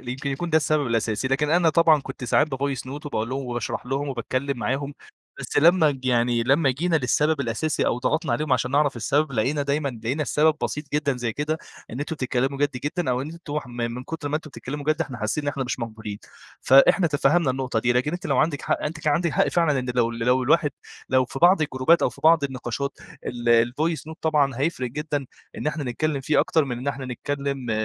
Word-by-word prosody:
يمكن 130 Hz, +3 st, -4 dB
يكون 165 Hz, +6 st, -3 dB
ده 160 Hz, -, +4 dB
السبب 150 Hz, -2 st, +1 dB
الأساسي. 115 Hz, +1 st, -1 dB
لكن 145 Hz, +3 st, +1 dB
أنا 170 Hz, 0 st, +4 dB
طبعًا 160 Hz, -1 st, +4 dB
كنت 130 Hz, -1 st, -8 dB
ساعات 145 Hz, +5 st, +3 dB
بvoice 135 Hz, -1 st, -2 dB
note 140 Hz, +3 st, -8 dB
وباقول 115 Hz, -5 st, -2 dB
لهم 135 Hz, +1 st, -3 dB
وباشرح 120 Hz, 0 st, -4 dB
لهم 135 Hz, +3 st, -2 dB
وباتكلّم 130 Hz, +1 st, -2 dB
معاهم، 140 Hz, +3 st, -2 dB, 0.5 s
بس -, -, -5 dB
لمّا 165 Hz, 0 st, +5 dB
ج 135 Hz, -2 st, -7 dB
يعني 120 Hz, -1 st, +2 dB
لمّا 135 Hz, +4 st, +3 dB
جينا 165 Hz, +6 st, 0 dB
للسبب 150 Hz, +2 st, +1 dB
الأساسي 140 Hz, +5 st, -1 dB
أو -, -, +1 dB
ضغطنا 155 Hz, +6 st, 0 dB
عليهم 150 Hz, -2 st, -1 dB
عشان 125 Hz, 0 st, +1 dB
نعرف 145 Hz, -1 st, +2 dB
السبب، 140 Hz, +5 st, 0 dB
لقينا 130 Hz, +6 st, 0 dB
دايمًا 140 Hz, +1 st, 0 dB, 0.2 s
لقينا 135 Hz, +7 st, 0 dB
السبب 155 Hz, +1 st, +3 dB
بسيط 150 Hz, -, -2 dB
جدًا 145 Hz, -3 st, +1 dB
زي 120 Hz, -2 st, -2 dB
كده، 150 Hz, +5 st, -2 dB, 0.3 s
إن 125 Hz, -, -6 dB
أنتم 155 Hz, +2 st, -4 dB
تتكلّموا 135 Hz, +1 st, -1 dB
جَد 145 Hz, 0 st, +2 dB
جدًا 150 Hz, -1 st, -1 dB
أو 125 Hz, 0 st, 0 dB
إن 145 Hz, -, -6 dB
أنتم 165 Hz, -3 st, -5 dB
ح 150 Hz, -, -9 dB
من 120 Hz, 0 st, -4 dB
كُتر 155 Hz, -1 st, -5 dB
ما 150 Hz, -, 0 dB
أنتم 155 Hz, 0 st, -8 dB
بتتكلّموا 145 Hz, +2 st, -6 dB
جَد 155 Hz, +2 st, 0 dB
إحنا 135 Hz, -6 st, -3 dB
حاسّين 120 Hz, +7 st, -2 dB
إن -, -, -1 dB
إحنا 140 Hz, -2 st, -2 dB
مش 125 Hz, -, -3 dB
مقبولين، 110 Hz, -3 st, -6 dB, 0.4 s
فإحنا 140 Hz, +8 st, +5 dB
تفهّمنا 145 Hz, 0 st, +2 dB
النقطة 130 Hz, -3 st, -1 dB
دي، 120 Hz, +2 st, +2 dB
لكن 125 Hz, +5 st, 0 dB
أنتِ 175 Hz, -, -4 dB
لو 135 Hz, -3 st, +1 dB
عندِك 150 Hz, -3 st, +1 dB
حق -, -, -1 dB
أنتِ 155 Hz, +1 st, -4 dB
كان 150 Hz, -1 st, +1 dB
عندِك 170 Hz, +3 st, +1 dB
حق -, -, +2 dB
فعلًا 165 Hz, -5 st, +2 dB
إن 125 Hz, -1 st, -2 dB
لو 120 Hz, -2 st, +2 dB
ال 115 Hz, -, -7 dB
لو 125 Hz, +3 st, +2 dB
الواحد 150 Hz, +3 st, +3 dB, 0.4 s
لو 130 Hz, 0 st, +3 dB
في 125 Hz, -, -7 dB
بعض 175 Hz, +2 st, +5 dB
الجروبات 150 Hz, +3 st, +2 dB
أو -, -, +3 dB
في -, -, -15 dB
بعض 160 Hz, -2 st, +6 dB
النقاشات 135 Hz, +1 st, -4 dB, 0.3 s
ال 120 Hz, -1 st, +2 dB
الvoice 160 Hz, +4 st, -1 dB
note 160 Hz, -, -10 dB
طبعًا 150 Hz, -4 st, +2 dB
هيفرق 135 Hz, -4 st, -1 dB
جدًا 145 Hz, 0 st, -3 dB, 0.3 s
إن -, -, -5 dB
إحنا 150 Hz, -1 st, -2 dB
نتكلّم 140 Hz, +3 st, -1 dB
فيه 150 Hz, +3 st, +2 dB
أكتر 160 Hz, -2 st, +2 dB
من 125 Hz, -3 st, -4 dB
إن 130 Hz, +3 st, -3 dB
إحنا 135 Hz, -1 st, -4 dB
نتكلّم 140 Hz, 0 st, -3 dB
140 Hz, 220 wpm, -24 LUFS, 125-150 Hz, 0.5 s, بعض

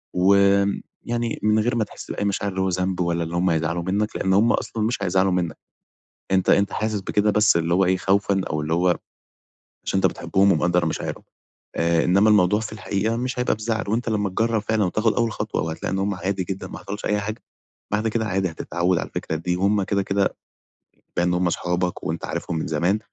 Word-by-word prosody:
وآمم 100 Hz, +2 st, +4 dB, 0.2 s
يعني 120 Hz, -1 st, -2 dB
من 105 Hz, 0 st, +3 dB
غير 120 Hz, +3 st, +1 dB
ما 115 Hz, -, +2 dB
تحس -, -, -9 dB
بأي 100 Hz, -, -2 dB
مشاعر 100 Hz, 0 st, -1 dB
اللي 95 Hz, 0 st, -2 dB
هو 95 Hz, -, +1 dB
ذنب 90 Hz, 0 st, -1 dB
ولا 85 Hz, -1 st, 0 dB
اللي 85 Hz, +1 st, -5 dB
هُم 90 Hz, 0 st, +2 dB
يزعلوا 80 Hz, +1 st, -1 dB
منّك، 100 Hz, +4 st, -1 dB
لأن 95 Hz, 0 st, +1 dB
هُم 110 Hz, +4 st, +4 dB
أصلًا 110 Hz, -2 st, -2 dB
مش 110 Hz, -2 st, -1 dB
هيزعلوا 95 Hz, 0 st, +2 dB
منّك، 90 Hz, -2 st, -1 dB, 0.7 s
أنت 95 Hz, -1 st, +2 dB
أنت 100 Hz, 0 st, +3 dB
حاسس 110 Hz, -2 st, -1 dB
بكده 105 Hz, +2 st, +1 dB
بس 105 Hz, -5 st, +4 dB
اللي 85 Hz, +1 st, 0 dB
هو 95 Hz, +1 st, +4 dB
إيه 95 Hz, +1 st, +2 dB
خوفًا 95 Hz, 0 st, +1 dB
أو 75 Hz, 0 st, -1 dB
اللي 80 Hz, +2 st, -2 dB
هو 90 Hz, +2 st, +2 dB, 1.0 s
عشان 95 Hz, -, 0 dB
أنت -, -, +2 dB
بتحبهم 100 Hz, +1 st, +2 dB
ومقدر 85 Hz, +2 st, +2 dB
مشاعرهم 80 Hz, -, -3 dB, 0.5 s
آآ، 85 Hz, 0 st, +2 dB
إنّما 100 Hz, +4 st, +4 dB
الموضوع 105 Hz, 0 st, +4 dB
في 110 Hz, -1 st, -5 dB
الحقيقة 105 Hz, +1 st, -1 dB
مش 125 Hz, 0 st, -3 dB
هيبقى 125 Hz, -, +1 dB
بزعل، 110 Hz, +1 st, -2 dB
وأنت 115 Hz, +2 st, 0 dB
لما 105 Hz, -2 st, 0 dB
تجرّب 110 Hz, +2 st, 0 dB
فعلًا 110 Hz, -1 st, +1 dB
وتاخد 110 Hz, +5 st, +1 dB
أول 115 Hz, -2 st, +1 dB
خطوة -, -, -3 dB
وهتلاقي 80 Hz, +3 st, -3 dB
إن 95 Hz, -, 0 dB
هُم 100 Hz, +1 st, 0 dB
عادي 95 Hz, 0 st, -2 dB
جدًا 95 Hz, 0 st, -5 dB
ما -, -, -8 dB
حصلش 105 Hz, +1 st, -6 dB
أي 105 Hz, 0 st, +1 dB
حاجة، 110 Hz, +2 st, -5 dB, 0.5 s
بعد 110 Hz, +2 st, +1 dB
كده 110 Hz, 0 st, -1 dB
عادي 95 Hz, -2 st, 0 dB
هتتعَوّد 85 Hz, +2 st, -1 dB
على -, -, -4 dB
الفكرة 80 Hz, -, -3 dB
دي 90 Hz, +2 st, -2 dB
وهُم 100 Hz, +2 st, +2 dB
كده 100 Hz, 0 st, 0 dB
كده 100 Hz, 0 st, 0 dB, 0.8 s
بما 85 Hz, -, +2 dB
إن 90 Hz, -, +1 dB
هُم 90 Hz, 0 st, +1 dB
أصحابك 90 Hz, +1 st, -1 dB
وأنت 80 Hz, +1 st, -3 dB
عارفهم 85 Hz, -, -3 dB
من -, -, -3 dB
زمان، 85 Hz, +7 st, +1 dB
95 Hz, 210 wpm, -23 LUFS, 90-105 Hz, 1.0 s, وآمم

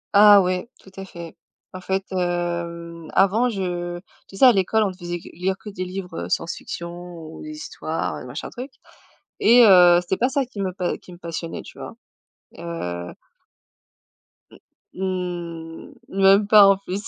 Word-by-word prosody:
Ah 205 Hz, 0 st, +9 dB
oui, 185 Hz, +3 st, -2 dB
tout 190 Hz, -, -17 dB
à 195 Hz, -, -6 dB
fait. 170 Hz, -3 st, -10 dB, 0.4 s
En 185 Hz, -, -8 dB
fait, 190 Hz, +1 st, -1 dB
hem, 170 Hz, -2 st, -3 dB
avant, 210 Hz, +6 st, +3 dB
je 175 Hz, -4 st, -3 dB, 0.3 s
tu -, -, -14 dB
sais, 265 Hz, -, +6 dB
à 255 Hz, -, +9 dB
l'école, 215 Hz, +1 st, +2 dB
on 200 Hz, -, 0 dB
te 185 Hz, -, -14 dB
faisait 175 Hz, -1 st, -5 dB
que -, -, -14 dB
lire 190 Hz, +3 st, -2 dB
que 210 Hz, -, -10 dB
des 185 Hz, -2 st, -5 dB
livres, 180 Hz, -2 st, -6 dB
heu, -, -, -9 dB
science-fiction 170 Hz, +1 st, -3 dB, 0.3 s
ou 160 Hz, -1 st, -10 dB
des 310 Hz, -, -8 dB
histoires, 305 Hz, 0 st, -4 dB
heu, -, -, -9 dB
machin -, -, -7 dB
truc 255 Hz, +3 st, -7 dB, 0.7 s
et 235 Hz, +2 st, +7 dB
heu, 180 Hz, -3 st, +7 dB
c'était 180 Hz, +2 st, -2 dB
pas 250 Hz, -, +1 dB
ça 275 Hz, 0 st, 0 dB
qui 220 Hz, -5 st, -7 dB
me 190 Hz, -1 st, -1 dB
pa 180 Hz, -1 st, -2 dB
qui 180 Hz, -, -14 dB
me -, -, -12 dB
passionnait, 165 Hz, -1 st, -6 dB
tu -, -, -14 dB
vois? -, -, -8 dB, 0.6 s
Heu 90 Hz, -, -5 dB, 1.4 s
Mmh, -, -, -15 dB, 1.5 s
mmh, 195 Hz, -, -3 dB
même 195 Hz, +1 st, +5 dB
pas 210 Hz, -1 st, +8 dB
en 195 Hz, 0 st, +5 dB
plus. 195 Hz, 0 st, -5 dB
185 Hz, 175 wpm, -22 LUFS, 175-200 Hz, 1.5 s, Ah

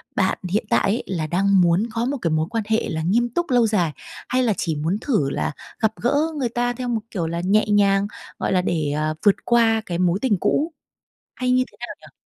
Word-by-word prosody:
bạn 190 Hz, -1 st, +1 dB
hiện 210 Hz, +5 st, 0 dB
tại -, -, +3 dB
ấy 220 Hz, +5 st, 0 dB
là 165 Hz, -5 st, -2 dB
đang 195 Hz, +3 st, +3 dB
muốn 175 Hz, +3 st, +3 dB
có 230 Hz, 0 st, -1 dB
một 280 Hz, +3 st, -1 dB
cái 165 Hz, -, 0 dB
mối 155 Hz, 0 st, +1 dB
quan 225 Hz, -1 st, -1 dB
hệ 220 Hz, +1 st, 0 dB
là 160 Hz, -, -2 dB
nghiêm 230 Hz, +9 st, +1 dB
túc 345 Hz, +8 st, -2 dB
lâu 245 Hz, -3 st, +4 dB
dài, 180 Hz, -7 st, +1 dB, 0.4 s
hay 255 Hz, +1 st, +2 dB
là 220 Hz, -4 st, +2 dB
chỉ 165 Hz, -3 st, -1 dB
muốn 160 Hz, +6 st, -1 dB
thử 210 Hz, -, +1 dB
là -, -, -2 dB, 0.3 s
gặp 220 Hz, -1 st, +1 dB
gỡ 245 Hz, +4 st, +2 dB, 0.2 s
người 250 Hz, -4 st, 0 dB
ta 245 Hz, +1 st, -1 dB
theo 250 Hz, +1 st, -5 dB
một 230 Hz, -2 st, -1 dB
kiểu 175 Hz, -6 st, -2 dB
là 170 Hz, +1 st, -3 dB
nhẹ 210 Hz, +3 st, +3 dB
nhàng, 200 Hz, -1 st, +3 dB, 0.3 s
gọi -, -, 0 dB
là, 185 Hz, -, +3 dB
để, 160 Hz, -5 st, -1 dB
ờ, 155 Hz, +1 st, -1 dB
vượt 205 Hz, -, +6 dB
qua 225 Hz, -2 st, +3 dB
cái 170 Hz, -, -3 dB
mối 180 Hz, +1 st, +1 dB
tình 225 Hz, -7 st, +2 dB
cũ 320 Hz, -, 0 dB, 0.6 s
hay 250 Hz, 0 st, -1 dB
như 255 Hz, 0 st, +3 dB
thế -, -, -21 dB
nào -, -, -7 dB
nhỉ? -, -, -16 dB
205 Hz, 240 wpm, -22 LUFS, 170-235 Hz, 0.6 s, vượt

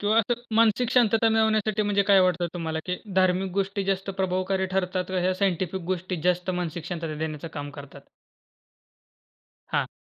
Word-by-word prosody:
किंवा 210 Hz, +2 st, +2 dB
असं 235 Hz, +2 st, 0 dB
मानसिक 230 Hz, +1 st, +3 dB
शांतता 225 Hz, -2 st, +4 dB
मिळवण्यासाठी 220 Hz, -1 st, +2 dB
म्हणजे 205 Hz, -1 st, +2 dB
काय 195 Hz, -1 st, +7 dB
वाटतं 180 Hz, -1 st, +2 dB
तुम्हाला, 160 Hz, -2 st, -3 dB
की 180 Hz, 0 st, -1 dB, 0.2 s
धार्मिक 185 Hz, 0 st, +2 dB
गोष्टी 195 Hz, +1 st, -1 dB
जास्त 195 Hz, 0 st, -1 dB
प्रभावकारी 190 Hz, 0 st, 0 dB
ठरतात 185 Hz, -1 st, 0 dB
का 185 Hz, 0 st, -1 dB
ह्या 185 Hz, +1 st, +1 dB
साइंटिफिक 185 Hz, -1 st, -1 dB
गोष्टी 185 Hz, 0 st, -3 dB
जास्त 180 Hz, +1 st, +1 dB
मानसिक 175 Hz, -2 st, -3 dB
शांतता 165 Hz, -3 st, -4 dB
देण्याचं 155 Hz, +1 st, -4 dB
काम 145 Hz, 0 st, -5 dB
करतात? 145 Hz, -1 st, -11 dB, 1.7 s
हां. -, -, +1 dB
185 Hz, 155 wpm, -26 LUFS, 175-205 Hz, 1.7 s, काय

